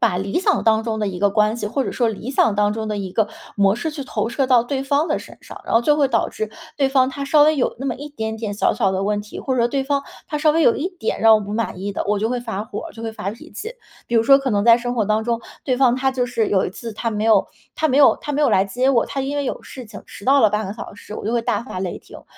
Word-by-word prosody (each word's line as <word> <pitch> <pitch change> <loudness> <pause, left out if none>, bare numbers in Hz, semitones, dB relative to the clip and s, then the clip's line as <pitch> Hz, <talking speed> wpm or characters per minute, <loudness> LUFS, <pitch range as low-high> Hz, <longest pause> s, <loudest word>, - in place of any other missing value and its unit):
把 180 - +2
理 195 - -1
想 390 0 +1
当 220 0 +3
中 220 -1 -3
的 210 - -1
一 180 -2 -5
个 205 - +3
关 210 +2 +2
系， 215 -3 -3
或 265 +5 -1
者 - - -3
说 240 -3 +1
理 225 +4 -5
想 225 -6 +2
当 205 0 +2
中 220 0 -4
的 210 - -2
一 190 -2 -5
个 220 -2 +1 0.3
模 200 0 +3
式 320 +7 -3
去 300 -2 -6
投 225 -2 -2
射 270 +3 0
到 250 -3 +5
对 265 +2 -3
方 285 +4 +1
的 - - 0
身 - - -12
上， - - -11
然 - - -2
后 230 - +5
就 295 +5 +4
会 285 -2 +3
导 - - +1
致 215 -1 -4 0.3
对 275 -2 +3
方 265 -1 +3
他 280 - -6
稍 295 +1 +5
微 310 0 +4
有 255 - 0
那 270 - -6
么 260 -3 -1
一 290 +2 -8
点 220 -6 -4
点 215 -2 -4
小 - - +2
小 195 -5 +1
的 190 - -1
问 205 +1 0
题， 210 0 -10
或 265 - -2
者 255 - 0
说 235 - +3
对 270 +1 -1
方 280 0 0 0.2
他 300 - -3
稍 305 0 +3
微 325 +1 +2
有 235 - +5
一 335 - -2
点 360 - -4
让 225 0 +7
我 215 - +3
不 205 0 -6
满 215 -4 -3
意 200 +1 -3
的， - - -2
我 205 0 +1
就 220 +3 -1
会 250 - -1
发 225 -4 -4
火 210 -2 -6
儿， - - -11
就 225 - -10
会 225 -1 -4
发 195 -2 -4
脾 225 - -12
气。 435 - -6 0.3
比 240 - -4
如 225 - +5
说 275 +4 +6
可 275 -1 -3
能 205 -2 +1
在 230 0 +7
生 245 0 -3
活 225 -4 +1
当 215 +1 +1
中， 235 0 -1 0.3
对 255 - 0
方 250 -2 +4
他 265 +1 +1
就 255 -1 -1
是 235 -3 -1
有 190 -2 +2
一 - - -3
次 230 +4 -8
他 230 +2 -2
没 210 0 -2
有 225 -1 +4 0.3
他 315 - +1
没 275 0 +2
有 280 - +6
他 295 - -4
没 290 - 0
有 295 - +4
来 190 - +3
接 245 +7 0
我， 245 -4 +3
他 275 - -4
因 275 +2 -3
为 285 - -1
有 - - -3
事 255 - -10
情 215 -2 -11
迟 200 - -12
到 275 +1 +5
了 220 - +6
半 210 0 -2
个 195 - -4
小 220 - -9
时， 205 +1 -10
我 - - -6
就 220 - -1
会 235 -1 +1
大 215 -1 -1
发 210 - -7
雷 185 - -4
霆。 - - -14
然 - - -15
230 Hz, 355 characters per minute, -21 LUFS, 210-270 Hz, 0.3 s, 让